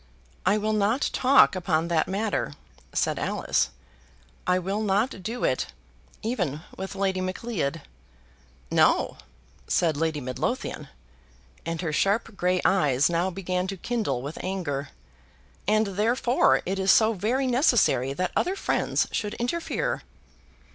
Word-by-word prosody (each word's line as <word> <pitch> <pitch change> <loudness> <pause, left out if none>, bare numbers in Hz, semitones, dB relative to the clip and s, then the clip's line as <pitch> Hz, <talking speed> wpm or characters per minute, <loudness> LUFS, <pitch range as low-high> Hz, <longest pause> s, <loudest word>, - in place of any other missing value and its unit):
"I 200 +3 +4
will 215 +1 0
not 215 +6 +1
talk 265 -5 +5
upon 170 -3 0
that 165 -2 +2
matter," 200 -5 -1 0.4
said - - 0
Alice. 65 -1 0 0.8
"I 180 0 +4
will 195 +4 -2
not 205 +1 0
do 230 +6 -4
it 130 - +1 0.6
even 180 - -1
with 190 +1 -6
Lady 190 -1 0
Macleod." 185 -5 -3 0.9
"No," - - +3 0.5
said 165 -3 +2
Lady 160 -1 0
Midlothian, 130 -2 -3 0.8
and 165 0 -2
her 160 -4 -2
sharp 205 +6 +1
grey 180 0 +1
eyes 150 -6 +3
now 170 +2 +1
began 185 0 -2
to 195 0 -4
kindle 185 - -2
with 145 +3 -6
anger; 165 -7 -3 0.8
"and 215 +1 +3
therefore 230 +6 +2
it 195 +2 -2
is 190 0 +4
so 220 0 +5
very 230 +7 0
necessary 240 - +3
that 180 +5 -2
other 370 +2 +1
friends - - 0
should 210 -1 -2
interfere." 340 - -2
190 Hz, 130 wpm, -26 LUFS, 165-220 Hz, 0.9 s, talk